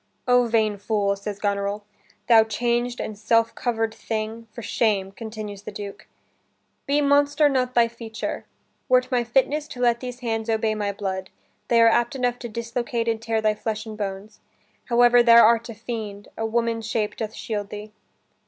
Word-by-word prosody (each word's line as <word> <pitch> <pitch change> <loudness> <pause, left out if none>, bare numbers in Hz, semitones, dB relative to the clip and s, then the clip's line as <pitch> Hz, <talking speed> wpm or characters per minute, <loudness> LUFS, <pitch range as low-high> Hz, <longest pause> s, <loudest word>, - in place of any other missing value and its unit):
"O 245 -1 +4
vain 220 -2 +1
fool," 200 -1 0
says 200 0 -6
Goneril. 200 0 -1 0.4
"Thou 230 -2 +7
changed 240 +2 -1
and 215 - -4
self 230 +2 +2
cover'd 225 -2 -1
thing, 225 +1 -4
for 235 - -9
shame," 200 -5 0
continues 215 -1 -7
the 205 - -8
Duke: 200 -1 -8 0.8
"Be 285 +1 +2
monster 285 +1 +4
not 255 -2 0
thy 235 -1 +5
feature. 230 -1 -6 0.4
Were't 255 +1 +3
my 245 -1 +2
fitness 275 +5 +1
To 250 - -10
let 240 -1 +3
these 250 0 -7
hands 225 -2 -2
obey 220 -1 +1
my 205 -1 -2
blood, 190 -2 -4 0.4
They 235 - +4
are - - +7
apt 240 +4 +2
enough 245 -2 -1
to 240 - -6
dislocate 235 +1 -3
and 225 -1 0
tear 225 -1 -1
Thy 215 -1 +2
flesh 215 +1 -4
and 220 -1 -7
bones; 205 0 -6 0.5
howe'er 240 0 +5
thou 235 -1 +7
art 230 +1 +3
a 230 - -7
fiend, 215 -3 -6
A 225 - -2
woman's 230 -1 -1
shape 220 -1 -1
doth 220 -1 -4
shield 205 -2 -4
thee." 210 0 -8
225 Hz, 175 wpm, -24 LUFS, 215-240 Hz, 0.8 s, Thou